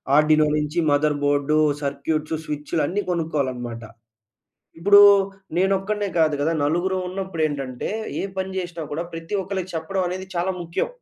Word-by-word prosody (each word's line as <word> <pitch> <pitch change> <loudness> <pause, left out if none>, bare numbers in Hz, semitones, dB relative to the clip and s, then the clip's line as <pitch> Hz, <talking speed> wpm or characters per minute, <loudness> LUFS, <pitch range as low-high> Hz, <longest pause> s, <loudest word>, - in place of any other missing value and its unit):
Arduino 155 +1 +5
నుంచి 150 +3 -1
mother 145 +1 +2
board, 145 +1 +2 0.3
circuits, 155 +3 -2
స్విచ్‌లు 150 +2 -2
అన్నీ 205 +3 -1
కొనుక్కోవాలనమాట. 130 -8 -2 1.0
ఇప్పుడూ, 200 +4 +7 0.5
నేనొక్కడినే 195 +2 +1
కాదు 155 -2 +3
కదా. 160 +3 +1
నలుగురం 175 +5 0
ఉన్నప్పుడు 185 -3 -4
ఏంటంటే, 135 -4 -4 0.3
ఏ - - -2
పని 190 0 -2
జేసినా 175 -3 -5
కూడా 155 +3 -2
ప్రతి 165 +4 -6
ఒక్కళ్ళకి 185 -1 -4
చెప్పడం 185 +4 -2
అనేది 185 +1 -5
చాలా 180 +2 0
ముఖ్యం. 170 0 -2
165 Hz, 135 wpm, -23 LUFS, 150-185 Hz, 1.0 s, ఇప్పుడూ